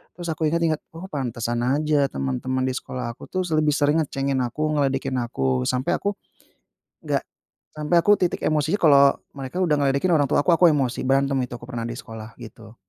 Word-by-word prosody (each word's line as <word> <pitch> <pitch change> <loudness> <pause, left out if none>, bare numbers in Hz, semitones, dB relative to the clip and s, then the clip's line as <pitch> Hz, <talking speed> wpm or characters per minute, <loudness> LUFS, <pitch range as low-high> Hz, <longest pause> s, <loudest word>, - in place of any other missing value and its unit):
Terus 175 -1 -7
aku 160 - -7
ingat-ingat, 165 -2 +1 0.2
"Oh, 170 +3 -7
pantesan 120 -4 -2
aja 150 +4 +1 0.2
teman-teman 70 - -2
di 130 - -1
sekolah 125 -2 -5
aku - - -14
tuh 185 - 0
s - - -8
lebih 155 -1 +3
sering 145 +2 +2
ngecengin 135 -1 -2
aku, 125 +5 -4
ngeledekin 135 -2 0
aku." 65 - -1
Sampai 125 +1 -1
aku 200 - -1 1.0
enggak, - - 0 0.5
sampai 150 +3 0
aku 205 +5 +4
titik 180 - 0
emosinya, 155 +4 +1
kalau 140 -3 +7 0.4
mereka 135 +3 -7
udah 155 -4 +2
ngeledekin 140 +6 +1
orang 145 -3 +3
tua - - +3
aku, - - +3
aku 180 - +3
emosi. 135 -4 0
Berantem 135 0 +2
itu 125 - -8
aku - - -13
pernah 120 -2 -4
di 120 - -5
sekolah, 110 -2 -9
gitu. 110 0 -12
135 Hz, 190 wpm, -23 LUFS, 120-155 Hz, 1.0 s, kalau